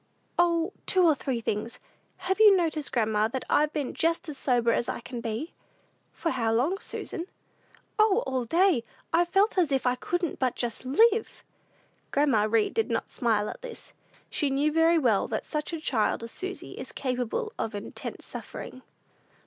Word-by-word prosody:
"O, 340 +2 +2
two 370 -2 +4
or 320 - +6
three 255 -3 -3
things. 215 +1 -3 0.5
Have 380 +2 0
you 420 -3 +8
noticed, 315 -4 -1
grandma, 220 -2 +2
that 255 +3 -4
I've 300 0 +3
been 290 -4 -3
just 330 +1 0
as 300 - -5
sober 245 -3 +2
as 235 - 0 0.2
can 245 -2 -5
be?" 230 +9 -4 0.6
"For 330 - -2
how 230 -4 0
long, 290 +12 +1
Susan?" 345 -3 -5 0.7
"O, 430 +2 +4
all 255 -2 -1
day; 335 - +3 0.3
I've 345 +1 +4
felt 390 +1 +3
as 330 -5 +2
if 270 -1 +1
I 250 - +4
couldn't 345 +5 -2
but 255 -2 +1
just 240 +1 -4
live!" 445 - +3 0.7
Grandma 265 -7 +3
Read 225 -1 +2
did 450 -1 0
not - - -2
smile 220 -4 +1
at - - -7
this. 480 -2 -10 0.4
She 290 - +1
knew 280 +3 +1
very 325 +2 +4
well 235 -10 +2
that - - -3
such 300 +1 -3
a 330 - -3
child 230 -7 0
as 230 - -6
Susy 380 +1 -5
is - - -8
capable 255 - -2
of 215 - -2
intense 205 - -6
suffering. 255 - -8
290 Hz, 175 wpm, -27 LUFS, 235-345 Hz, 0.7 s, you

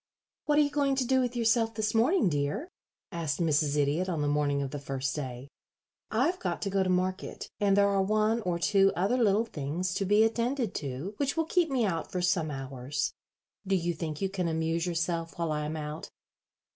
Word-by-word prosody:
"What 295 -1 +2
are 300 - +6
you 285 - -1
going 280 -2 +1
to 260 -1 0
do 260 +2 +3
with 250 -1 -2
yourself 225 -1 +2
this 215 0 -1
morning, 250 - +3
dear?" 160 - -1 0.4
asked 165 -4 -2
Mrs. 150 -3 +2
Idiot 150 +6 +1
on 160 -4 -1
the - - +1
morning 145 -1 +1
of 135 - -5
the 145 - -4
first 135 -1 -3
day. 130 -3 -5 0.6
"I've 290 +12 +1
got - - -2
to 200 - -2
go 195 0 +2
to 185 - +1
market, 185 +1 -2
and 200 -1 +3
there 200 0 +5
are 200 -1 +2
one 215 +3 +2
or 180 -4 -1
two 195 +3 +4
other 195 +7 +1
little 220 -2 +3
things 165 0 -3
to 195 - -1
be 205 +3 +5
attended 230 0 0
to 145 +7 -4
which 280 +2 -1
will 325 - +2
keep 340 0 +2
me 255 -4 +1
out 165 -5 -2
for 180 - -2
some 175 -3 +1
hours. 135 0 -3 0.5
Do 195 - +2
you 175 -1 0
think 155 -1 -5
you 195 - +1
can 185 -3 -1
amuse 165 +1 0
yourself 170 -1 -2
while 165 -2 -1
I 150 0 -1
am 155 +1 -3
out?" 150 +1 -6
185 Hz, 210 wpm, -29 LUFS, 150-225 Hz, 0.6 s, are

